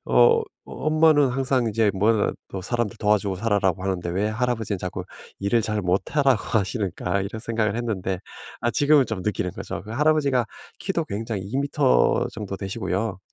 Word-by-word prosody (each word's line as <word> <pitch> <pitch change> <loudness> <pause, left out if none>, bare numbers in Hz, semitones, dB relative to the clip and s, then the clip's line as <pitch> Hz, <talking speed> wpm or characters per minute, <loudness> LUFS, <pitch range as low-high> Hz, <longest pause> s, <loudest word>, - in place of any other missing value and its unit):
어 465 -1 +5
'어 - - -2 0.2
엄마는 155 -2 +3
항상 130 -1 +1
이제 110 -1 +2
"뭐라도 105 +2 +2 0.3
사람들 120 +2 -2
도와주고 105 -2 +2
살아."라고 95 -3 +1
하는데 95 -3 -2
왜 100 +4 0
할아버지는 110 -3 -1
자꾸 90 0 -5 0.4
일을 100 +4 +2
잘 105 -1 -1
못하라고 125 +7 +2 0.2
하시는가?' 100 -2 -1
이런 110 +3 -5
생각을 110 -2 -1
했는데 95 -6 -2 0.4
아 120 - +1
지금은 145 +1 +4
좀 100 -5 -4
느끼는 90 -3 -1
거죠. - - -6
그 105 - -11
할아버지가 140 -3 +2 0.3
키도 170 -5 -1
굉장히 105 -1 -4
2 105 +7 -4
미터 140 -1 +2
정도 100 -2 -5
되시고요. 95 0 -3
110 Hz, 370 characters per minute, -24 LUFS, 100-125 Hz, 0.4 s, 어